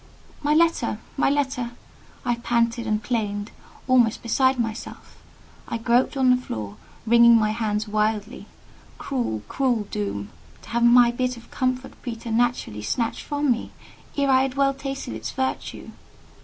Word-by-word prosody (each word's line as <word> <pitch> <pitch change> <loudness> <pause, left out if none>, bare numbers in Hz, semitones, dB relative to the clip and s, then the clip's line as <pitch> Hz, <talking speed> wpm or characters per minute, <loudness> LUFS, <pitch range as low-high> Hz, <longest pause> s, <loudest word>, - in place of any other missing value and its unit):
"My 295 +1 +2
letter! 325 -9 +2 0.2
my 275 - +2
letter!" 265 -4 -1 0.5
I 240 -1 +1
panted 235 -1 0
and 215 0 0
plained, 210 -3 -2 0.4
almost 245 -4 +3
beside 260 +3 +2
myself. 225 0 -5 0.5
I - - -2
groped 240 +4 +2
on 260 -1 +4
the 250 0 +3
floor, 105 - -6 0.3
wringing 235 +1 +7
my 215 -1 +2
hands 215 -1 -1
wildly. 215 +2 -1 0.5
Cruel, 235 - -3
cruel 250 -5 0
doom! 100 0 -3 0.3
To - - -13
have 235 0 0
my 240 0 +7
bit 250 0 -2
of 235 - -15
comfort 255 0 -1
preternaturally 230 - -1
snatched 225 - -1
from 290 -2 0
me, 235 - -2 0.4
ere 280 -1 +2
I 260 0 +5
had 265 -1 -1
well 275 0 +3
tasted 275 - -5
its 110 +1 -5
virtue! 260 0 -4
235 Hz, 145 wpm, -24 LUFS, 220-260 Hz, 0.5 s, wringing